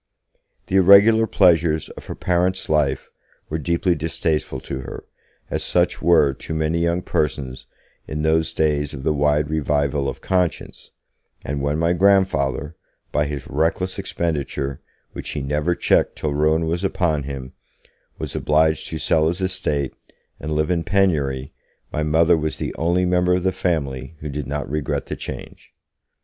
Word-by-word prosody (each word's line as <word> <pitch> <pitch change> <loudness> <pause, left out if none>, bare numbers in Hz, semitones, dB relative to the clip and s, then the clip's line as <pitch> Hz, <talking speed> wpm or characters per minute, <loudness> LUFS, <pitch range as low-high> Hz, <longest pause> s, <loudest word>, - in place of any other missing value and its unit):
The 95 - +1
irregular 100 +4 +7
pleasures 85 -6 +3
of - - -11
her - - -5
parents' 90 +1 0
life 75 -4 +1 0.4
were 80 - -2
deeply 85 +3 +1
distasteful 80 -3 -2
to 65 - -5
her, 65 - -8 0.5
as - - -1
such - - +1
were 80 -5 +4
to 80 - -6
many 80 +1 0
young 85 +1 0
persons 65 -4 -2 0.4
in 75 0 -3
those 80 +1 +2
days 75 -1 0
of 65 - -8
the 75 - +2
wide 75 +1 +2
revival 70 -2 0
of - - -7
Conscience, 90 -3 -2 0.6
and 70 0 -3
when 70 +2 0
my 85 +2 +2
grandfather, 85 -6 +2 0.4
by 75 0 +1
his 70 -2 -5
reckless 85 +6 -1
expenditure, 75 -7 -3 0.3
which - - -6
he 75 - -3
never 75 +5 0
checked - - +2
till 75 -2 -2
ruin 80 +2 +2
was 85 +3 -2
upon 85 -6 0
him, 70 -2 -7 0.6
was - - -6
obliged 80 +1 +2
to 80 - -4
sell 80 0 +2
his 85 +3 -1
estate, 75 -7 -1 0.5
and 75 - -5
live 75 +2 +1
in 85 -2 0
penury, 75 -10 0 0.4
my 75 - -1
Mother 80 +3 +4
was 80 -1 -2
the - - -4
only 85 +3 +1
member 90 0 +2
of 90 - -1
the 95 - +2
family 70 -5 -2
who 75 - -5
did 70 -1 -4
not 75 0 -3
regret 75 +1 -2
the - - -5
change. - - -9
80 Hz, 160 wpm, -22 LUFS, 75-85 Hz, 0.6 s, irregular